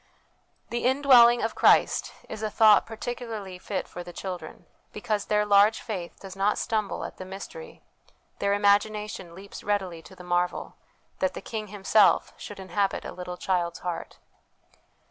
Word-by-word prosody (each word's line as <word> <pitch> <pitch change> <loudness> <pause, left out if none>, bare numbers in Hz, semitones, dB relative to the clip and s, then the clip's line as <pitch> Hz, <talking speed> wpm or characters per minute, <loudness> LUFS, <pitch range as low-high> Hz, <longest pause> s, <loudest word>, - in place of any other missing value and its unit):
The 240 0 -2
Indwelling 250 -3 +6
of 225 - -1
Christ - - +3 0.2
is 215 - -7
a 215 - -1
thought 215 -1 +5
particularly 225 -5 -6
fit 190 +1 -4
for 175 - -8
the 175 - -9
children, 180 0 -7 0.3
because 210 -2 -2
their 210 0 +1
large 205 +1 +5
faith 185 -6 -6
does 195 -1 -10
not 200 +2 +1
stumble 215 -3 -2
at - - -9
the - - -7
mystery, 470 - -9 0.6
their 200 0 +1
imagination 205 -3 +1
leaps 200 +2 -10
readily 190 -5 -2
to 190 - -15
the 180 - -12
marvel, 175 0 -1 0.4
that 280 0 0
the - - -4
King 215 -2 -5
Himself 205 0 +3
should 205 - -9
inhabit 195 +1 -1
a - - -5
little 180 0 -7
child's 175 -2 -1
heart. 175 -2 -5
205 Hz, 155 wpm, -26 LUFS, 185-220 Hz, 0.6 s, Indwelling